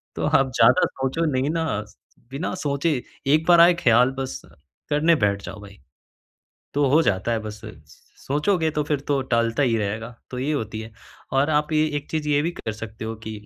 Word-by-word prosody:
तो - - -2
आप 135 -1 +2
ज़्यादा 185 - +5
सोचो 135 +5 -2
नहीं 130 +2 0
ना, 165 0 -1 0.7
बिना 140 +6 -3
सोचे 145 -3 -1 0.3
एक 155 +1 +3
बार 170 -1 +7
आए 175 +1 +7
ख़याल 125 +2 +5
बस 135 0 -4 0.5
करने 155 +3 +3
बैठ 100 -1 0
जाओ 110 - -8
भाई। 100 0 -13 1.0
तो 145 0 +2
हो 155 +4 +5
जाता 105 -1 0
है 115 - +1
बस 105 0 -8
स - - -14 0.2
सोचोगे 160 +4 +1
तो 150 0 -1
फिर 145 -1 -1
तो 140 -2 +2
टालता 115 +3 +2
ही 120 -3 +2
रहेगा, 110 +2 -3 0.2
तो 125 - -5
ये 140 +4 -1
होती 110 -6 -3
है। 110 0 -8 0.4
और 135 +3 +2
आप 150 0 +1
ये 155 0 +3
एक 145 - -6
चीज़ 155 -2 -2
ये 145 -1 +3
भी 165 - 0
कर 110 - -5
सकते 110 +1 -8
हो 110 - -4
कि 110 - -5
135 Hz, 200 wpm, -23 LUFS, 115-155 Hz, 1.0 s, बार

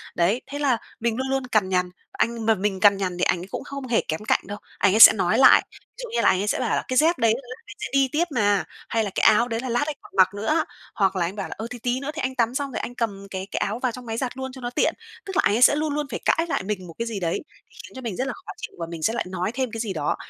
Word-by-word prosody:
Đấy, 195 +9 +2
thế 285 - -4
là 270 -5 +2 0.2
mình 230 0 -1
luôn 265 - -2
luôn 270 -1 -1
cằn 215 -6 +1
nhằn. 180 -1 +1 0.2
Anh 230 -1 -1
mà 225 -1 +4
mình 195 0 -2
cằn 200 0 +5
nhằn 185 -2 -3
thì 180 - -1
ảnh 180 +1 +1
cũng - - -6
không 280 -2 -7
hề 235 - +2
kém 160 +6 -3
cạnh - - +3
đâu, 205 - -5 0.2
ảnh 200 -1 +3
ấy 220 - +2
sẽ - - +12
nói - - +1
lại, - - +8
ví - - -15
dụ 480 - -6
như - - +2
là - - +5
ảnh 185 - +2
ấy 205 - -2
sẽ - - 0
bảo - - -1
là - - -1
"Cái 255 - -1
dép 325 +4 +4
đấy 225 -1 +3
đấy 255 - -4 0.2
anh 415 - -11
sẽ - - -3
đi 275 -1 +4
tiếp 315 +3 +2
mà" 205 -3 +2 0.3
hay 225 -1 +1
là 205 - -2
"Cái - - +1
áo 225 +2 +5
đấy 230 -1 -2
là 255 - -4
lát 240 +4 +1
anh 305 - -3
còn - - -16
mặc 185 +1 +5
nữa." 305 +11 0 0.3
Hoặc 195 -2 +2
là 175 - +1
anh 180 +4 -5
bảo 200 -2 -4
là - - -6
"Ờ, 220 - -5
thì 245 0 -8
tí 245 +2 -1
nữa 280 +2 -4
thì 320 - -4
anh 260 0 -2
tắm 240 0 +1
xong 280 -1 -2
rồi - - -3
anh 245 - -6
cầm 200 -4 -3
cái 190 0 -5
cái - - -3
áo 215 +4 -2
vào 255 -1 0
trong 250 +1 -10
máy 225 0 -4
giặt 255 +1 -3
luôn 265 0 -5
cho 260 0 -11
nó 240 - -3
tiện." 245 - +1 0.3
Tức 385 - -6
là 390 - +4
ảnh 205 - +3
ấy 240 - 0
sẽ 285 - +7
luôn 300 0 -1
luôn 295 -1 -2
phải - - -3
cãi 330 - +2
lại - - -1
mình 190 -2 -4
một 165 - -10
cái 230 - -1
gì 220 -3 -4
đấy, 170 -3 -1 0.3
để - - -26
khiến - - -13
cho 260 - -7
mình 230 -7 -4
rất 260 +1 -2
là 260 - -3
khó - - -10
chịu - - -8
và 165 - -3
mình 165 -2 -7
sẽ 225 - +2
lại 235 - -2
nói 185 +3 -2
thêm 255 -2 -2
cái 225 - -5
gì 215 -4 -2
đó. 150 -3 -1
230 Hz, 335 wpm, -24 LUFS, 195-260 Hz, 0.3 s, sẽ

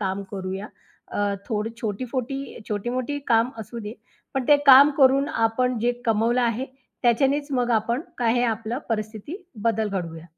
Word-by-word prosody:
काम 195 0 -2
करूया. 190 +1 -5 0.4
अ, - - -3 0.3
थोड 220 -1 -1
छोटी-फोठी 255 +5 -4
छोटी-मोठी 245 +7 -2
काम 230 +1 +3
असू 220 +2 -7
दे. 210 +1 -7 0.4
पण 265 - 0
ते 295 - +8
काम 275 +2 +9
करून 275 +2 +5
आपण 240 -1 0
जे 240 +2 +1
कमवलं 230 +3 +2
आहे 235 +2 0 0.4
त्याच्यानेच 275 +4 +2
मग 245 -2 +1
आपण 235 +3 +1 0.2
काय 230 -2 +2
हे 245 - +2
आपलं 225 +1 -2
परिस्थिती 220 - -4 0.3
बदल 220 -2 +1
घडवूया. 170 -4 -5
235 Hz, 150 wpm, -24 LUFS, 215-255 Hz, 0.4 s, काम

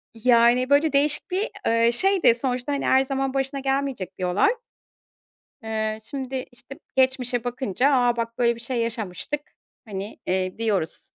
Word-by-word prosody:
Yani, 240 +2 +4
böyle, 290 +1 +3
değişik 290 +4 +1
bir, 395 +5 0 0.2
eee, 230 +1 +3
şeydi. 370 -2 +3
Sonuçta, 250 +2 -2
hani, 280 - -2
her 265 - +5
zaman 270 0 -2
başına 270 0 -1
gelmeyecek 270 -8 -2
bir - - -3
olay. 190 - +3 1.1
Eee, 220 -1 -2
şimdi, 265 0 -5
işte, 245 +3 -12 0.2
geçmişe 255 -2 +1
bakınca, 250 +2 0
"A, 245 -2 +3
bak 230 0 -3
böyle 235 -1 +2
bir 230 - -12
şey 245 +1 -3
yaşamıştık." 230 +5 -3 0.4
hani, 200 -1 -6
eee, 185 0 -1
diyoruz. 205 -8 -1
245 Hz, 150 wpm, -24 LUFS, 225-270 Hz, 1.1 s, her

